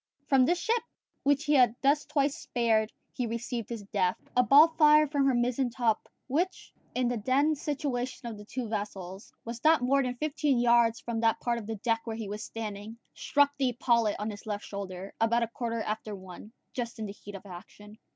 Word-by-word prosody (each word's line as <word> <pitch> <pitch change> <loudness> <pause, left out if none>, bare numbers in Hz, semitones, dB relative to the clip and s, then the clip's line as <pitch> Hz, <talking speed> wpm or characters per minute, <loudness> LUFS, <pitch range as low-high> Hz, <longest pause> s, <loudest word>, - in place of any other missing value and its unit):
From 265 -2 +5
this 350 +6 +2
ship, 460 +5 +1 0.4
which 285 +1 +2
he 300 -1 +1
had 250 -5 +5
thus 290 +2 +3
twice 290 -2 +1
spared, 225 -3 0 0.2
he 245 - -2
received 235 0 -4
his 230 -3 -5
death. 190 -2 0 0.2
A 250 - +6
ball 285 +7 +7
fired 305 -2 +5
from 280 -2 +2
her 265 - +3
mizzen 245 +1 +1
top, 235 -2 0 0.2
which, 335 +8 -2 0.2
in 250 -1 +1
the 245 0 -1
then 280 +6 +3
situation 275 -5 -3
of 230 - -5
the 210 - -11
two 245 +2 -4
vessels, 200 -3 -5
was 235 +1 -7
not 315 -3 +5
more 275 +2 +3
than 250 -1 -3
fifteen 295 -1 0
yards 235 -1 +4
from 235 -1 -4
that 225 0 +2
part 235 -1 -1
of 210 - -9
the 225 - -3
deck 225 +2 0
where 225 -1 -4
he 220 -3 -5
was 210 +2 -5
standing, 215 0 -6 0.2
struck 285 0 +2
the 265 -2 +3
epaulet 235 -3 +2
on 210 +1 -3
his 205 +1 -11
left 205 -1 -3
shoulder, 195 -1 -6
about 235 +1 +3
a - - -1
quarter 230 -2 -3
after 215 0 -4
one, 190 +2 -11 0.2
just 240 -2 -4
in 220 - -4
the 200 - -6
heat 205 0 -11
of 195 - -10
action. 210 +3 -12
235 Hz, 210 wpm, -29 LUFS, 215-275 Hz, 0.4 s, ball